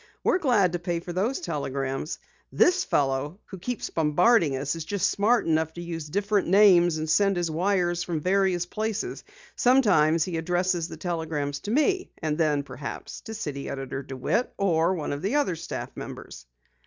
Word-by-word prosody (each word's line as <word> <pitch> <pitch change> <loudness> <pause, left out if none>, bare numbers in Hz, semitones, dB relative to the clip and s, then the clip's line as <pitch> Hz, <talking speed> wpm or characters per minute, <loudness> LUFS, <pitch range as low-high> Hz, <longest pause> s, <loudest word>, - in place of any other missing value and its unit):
We're 360 - +3
glad 225 - +3
to 175 - -1
pay 175 -1 -2
for 175 +1 -7
these 215 +9 0
telegrams. 140 -2 -3 0.3
This 365 +1 +3
fellow 140 - 0
who 190 - -10
keeps 245 +5 -4
bombarding 160 - +3
us 140 +4 -2
is 165 - -5
just 195 +3 0
smart 225 +4 +2
enough 160 0 +1
to 175 - -7
use 165 -3 -6
different 200 +3 0
names 175 -3 +5
and 155 0 -3
send 195 +4 +3
his 175 -2 -1
wires 175 0 +1
from 170 -3 -2
various 185 +1 +1
places. 220 +3 -3 0.3
Sometimes 185 - +4
he 175 -1 -3
addresses 175 0 0
the - - -9
telegrams 155 -4 -3
to - - -7
me, 365 - +1
and 155 -2 -1
then 150 -3 +1
perhaps 140 0 -7
to 225 - -6
City 145 -9 -5
Editor 135 0 -4
DeWitt 135 - -2
or 175 -2 +2
one 150 -4 -3
of 145 - -5
the 200 - -1
other 285 - +1
staff - - -6
members." 60 - -9
175 Hz, 175 wpm, -26 LUFS, 155-200 Hz, 0.3 s, names